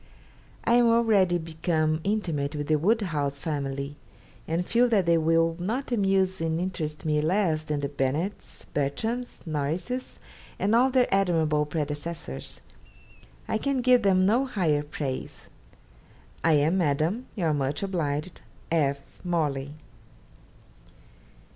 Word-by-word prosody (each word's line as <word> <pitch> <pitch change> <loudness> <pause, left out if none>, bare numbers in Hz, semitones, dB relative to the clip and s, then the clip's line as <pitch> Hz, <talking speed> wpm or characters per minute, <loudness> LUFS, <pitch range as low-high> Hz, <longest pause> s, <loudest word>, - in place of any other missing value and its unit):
I 230 - +2
am 240 0 +5
already 220 -6 +4
become 160 -1 -1
intimate 165 -9 -1
with 145 0 -3
the 155 -1 +3
Woodhouse 165 -8 0
family, 140 -1 -3 0.5
and 165 +2 -1
feel 240 +4 +3
that 205 -6 +3
they 170 -1 +4
will 165 +1 +2
not 235 +10 -3
amuse 195 -4 +1
and 165 0 0
interest 160 -5 -3
me 150 -1 +2
less 165 -1 +1
than 150 -2 -3
the 140 - -1
Bennetts, 145 +8 -3
Bertrams, 220 - -2
Norrises, 165 - -3 0.4
and 205 +3 +1
all 250 +3 +5
their 255 -1 +4
admirable 160 -6 +2
predecessors. 150 +2 -4 0.9
I 220 - 0
can 275 +1 0
give 250 0 +5
them 190 -2 +3
no 240 +7 +3
higher 165 - +1
praise. 145 -3 -5 0.9
'I 165 - +4
am, 155 +5 +3
Madam, 165 - 0
your 165 -7 +1
much 145 +3 -1
obliged 165 -3 -2 0.3
'F. 140 -4 +1 0.2
MORLEY.' 150 -5 -1
165 Hz, 125 wpm, -27 LUFS, 150-200 Hz, 0.9 s, am